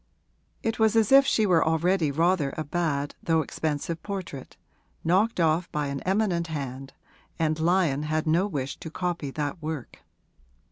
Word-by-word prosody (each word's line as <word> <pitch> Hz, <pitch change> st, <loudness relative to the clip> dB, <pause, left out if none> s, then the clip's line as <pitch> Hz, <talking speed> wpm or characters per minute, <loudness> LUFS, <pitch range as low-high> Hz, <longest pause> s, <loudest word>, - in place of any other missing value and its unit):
It 225 Hz, 0 st, -1 dB
was 220 Hz, 0 st, +3 dB
as 225 Hz, 0 st, +3 dB
if 275 Hz, 0 st, +7 dB
she 220 Hz, -, +3 dB
were 175 Hz, -5 st, +4 dB
already 165 Hz, +1 st, +2 dB
rather 160 Hz, -1 st, +1 dB
a 155 Hz, -, -1 dB
bad 145 Hz, -2 st, -1 dB
though 165 Hz, -1 st, +2 dB
expensive 155 Hz, +2 st, -3 dB
portrait, 185 Hz, -10 st, -6 dB, 0.5 s
knocked 190 Hz, +6 st, +2 dB
off 165 Hz, +1 st, +2 dB
by 150 Hz, -1 st, -1 dB
an 140 Hz, 0 st, -3 dB
eminent 185 Hz, -3 st, 0 dB
hand, 135 Hz, -3 st, -5 dB, 0.4 s
and 155 Hz, -1 st, 0 dB
Lyon 165 Hz, -4 st, +2 dB
had 155 Hz, +1 st, -1 dB
no 170 Hz, +5 st, +2 dB
wish 140 Hz, -7 st, -4 dB
to 160 Hz, -, -8 dB
copy 170 Hz, -3 st, -3 dB
that 145 Hz, +4 st, -4 dB
work. 155 Hz, -4 st, -6 dB
160 Hz, 155 wpm, -26 LUFS, 150-185 Hz, 0.5 s, if